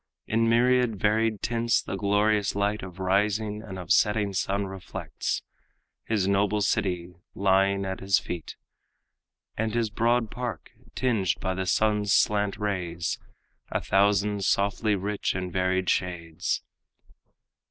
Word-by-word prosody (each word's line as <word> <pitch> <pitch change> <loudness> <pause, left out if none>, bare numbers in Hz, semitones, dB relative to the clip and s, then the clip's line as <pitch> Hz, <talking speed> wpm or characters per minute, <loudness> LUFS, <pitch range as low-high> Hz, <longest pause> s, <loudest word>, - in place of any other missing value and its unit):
In 115 +1 +1
myriad 125 0 +3
varied 110 0 +1
tints 115 0 +1
the - - -4
glorious 105 +1 +1
light 100 +1 0
Of 90 -1 -9
rising 105 +3 0
and 95 -4 -8
of 90 -3 -6
setting 105 -1 +3
sun 100 +1 0
reflects; 95 -1 -4 0.6
His 105 -4 0
noble 100 +1 +2
city 90 -3 0 0.2
lying 100 0 +2
at 95 0 -4
his 95 0 +3
feet, 85 -2 -5 1.0
And 110 0 -2
his 115 -2 0
broad 115 +1 +1
park, 120 -9 -5 0.2
tinged 110 -7 +1
by 95 - -1
the 95 0 -3
sun's 105 -1 +2
slant 105 -1 +2
rays 90 -5 -2 0.5
A - - 0
thousand 100 +1 +2
softly 100 +2 +1
rich 100 +1 -2
and 90 -1 -4
varied 95 0 +1
shades. 85 -3 -1
100 Hz, 130 wpm, -27 LUFS, 95-110 Hz, 1.0 s, myriad